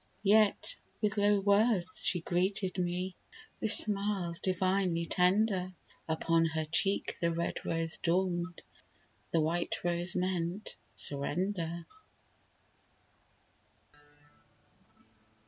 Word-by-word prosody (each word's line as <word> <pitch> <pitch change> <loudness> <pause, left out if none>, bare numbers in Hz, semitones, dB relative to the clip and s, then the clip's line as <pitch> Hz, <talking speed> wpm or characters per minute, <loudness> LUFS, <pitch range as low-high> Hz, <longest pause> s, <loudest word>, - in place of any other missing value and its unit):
Yet 210 0 +3 0.2
with 210 -1 0
low 205 0 +3
words 200 -2 +2
she 175 - 0
greeted 185 +2 -1
me, 180 +1 -2 0.4
With 220 - +3
smiles 200 -5 +3
divinely 185 -2 0
tender; 185 +1 +2 0.3
Upon 165 +1 +2
her 160 -1 -2
cheek 195 +5 +1
the 170 0 +1
red 170 +1 -3
rose 165 -1 -1
dawned, 175 0 -1 0.7
The 165 - +1
white 170 +3 -1
rose 175 +1 0
meant 180 +1 -2 0.2
surrender. 170 +3 -2
180 Hz, 90 wpm, -31 LUFS, 170-195 Hz, 0.7 s, Yet